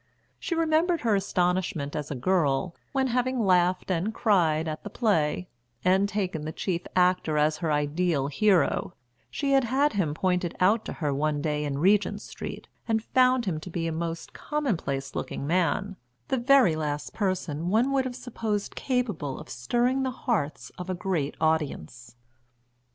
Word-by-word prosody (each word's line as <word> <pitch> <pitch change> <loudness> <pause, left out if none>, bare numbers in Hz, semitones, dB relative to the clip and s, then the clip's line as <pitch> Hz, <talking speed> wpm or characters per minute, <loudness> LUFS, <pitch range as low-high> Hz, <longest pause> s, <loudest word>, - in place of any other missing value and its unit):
She 350 - -2
remembered 330 +1 +2
her 225 -3 +2
astonishment 180 -5 0
as 150 -1 -3
a 145 - -3
girl 165 +2 +1 0.2
when, 270 -1 +1
having 250 -1 0
laughed 180 0 +2
and 185 +5 0
cried 165 -9 +2
at 155 0 -5
the 205 - -6
play, 180 -7 +1 0.4
and 190 +2 +3
taken 185 -6 -2
the 155 +1 -4
chief 175 +1 -2
actor 180 -4 +2
as 150 +1 +2
her 165 -3 -1
ideal 150 0 +1
hero, 185 +4 +2 0.3
she 280 -1 -2
had 270 -2 +4
had 275 +5 +2
him 165 -8 0
pointed 180 0 0
out 205 +5 +3
to - - -4
her 150 -4 -1
one 150 +1 0
day 150 0 -1
in 140 -2 -2
Regent 200 +6 +3
Street, - - -7 0.2
and 220 -1 +1
found 255 -1 +3
him 170 -5 -1
to 170 - -9
be 165 -1 -3
a 165 - -1
most 165 +1 -4
commonplace 180 - -2
looking - - -4
man, 185 +4 0 0.3
the 265 - +1
very 250 - +5
last 150 -2 -3
person 180 -5 -2
one 230 +7 +2
would 270 -1 +2
have 250 -1 -4
supposed 225 -5 -3
capable 215 - -2
of - - -11
stirring 240 - 0
the 265 - 0
hearts 215 - -2
of 180 +1 -6
a 185 - -1
great 175 -6 -2
audience. 130 - -2
180 Hz, 165 wpm, -27 LUFS, 155-230 Hz, 0.4 s, very